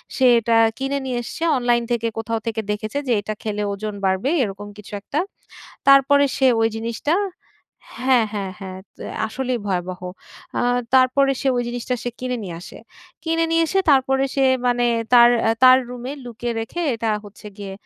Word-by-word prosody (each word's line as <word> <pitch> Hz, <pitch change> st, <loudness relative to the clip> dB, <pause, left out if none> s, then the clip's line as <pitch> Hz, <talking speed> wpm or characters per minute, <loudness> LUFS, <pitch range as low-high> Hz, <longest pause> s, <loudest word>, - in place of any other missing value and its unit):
সে 260 Hz, -, +2 dB
এটা 230 Hz, 0 st, +2 dB, 0.2 s
কিনে 270 Hz, +1 st, -2 dB
নিয়ে 250 Hz, -2 st, -2 dB
এসছে। 325 Hz, +7 st, -6 dB
অনলাইন 240 Hz, -1 st, +2 dB
থেকে, 230 Hz, -1 st, 0 dB
কোথাও 225 Hz, 0 st, -2 dB
থেকে 225 Hz, -1 st, -1 dB
দেখেছে 215 Hz, +4 st, -4 dB
যে -, -, 0 dB
এইটা 215 Hz, +1 st, -4 dB
খেলে 210 Hz, -1 st, -2 dB
ওজন 210 Hz, +1 st, -5 dB
বাড়বে 190 Hz, +7 st, +1 dB
এরকম 205 Hz, 0 st, -5 dB
কিছু 210 Hz, 0 st, -12 dB
একটা। 280 Hz, +8 st, -3 dB, 0.7 s
তারপরে 275 Hz, +1 st, +6 dB
সে 265 Hz, -, +3 dB
ওই 225 Hz, -, +3 dB
জিনিসটা 230 Hz, +7 st, -1 dB, 0.9 s
হ্যাঁ, 255 Hz, -4 st, +4 dB
হ্যাঁ, 195 Hz, -3 st, -4 dB
হ্যাঁ। 185 Hz, -1 st, -7 dB, 0.2 s
তো -, -, -10 dB, 0.3 s
আসলেই 255 Hz, +1 st, -2 dB
ভয়াবহ। 185 Hz, -1 st, -3 dB, 0.6 s
আ -, -, +1 dB, 0.3 s
তারপরে 260 Hz, +1 st, +4 dB
সে 275 Hz, -, 0 dB
ওই 245 Hz, -, +1 dB
জিনিসটা 245 Hz, +1 st, -3 dB
সে 245 Hz, -, -3 dB
কিনে 250 Hz, 0 st, -2 dB
নিয়ে 175 Hz, -3 st, -6 dB
আসে। 180 Hz, -, -11 dB, 0.5 s
কিনে 330 Hz, 0 st, +1 dB
নিয়ে 330 Hz, 0 st, +3 dB
এসে 385 Hz, +4 st, +1 dB
তারপরে 270 Hz, 0 st, +3 dB
সে 275 Hz, -, +2 dB, 0.2 s
মানে 245 Hz, 0 st, +2 dB, 0.3 s
তার 240 Hz, 0 st, +8 dB
অ্যা 225 Hz, -, +3 dB
তার 255 Hz, 0 st, +9 dB
রুমে 250 Hz, +2 st, -6 dB
লুকিয়ে 240 Hz, 0 st, -4 dB
রেখে 225 Hz, +10 st, -5 dB
এটা 225 Hz, 0 st, -3 dB, 0.2 s
হচ্ছে 205 Hz, +1 st, -13 dB
গিয়ে 195 Hz, -1 st, -6 dB
240 Hz, 175 wpm, -21 LUFS, 215-265 Hz, 0.9 s, তার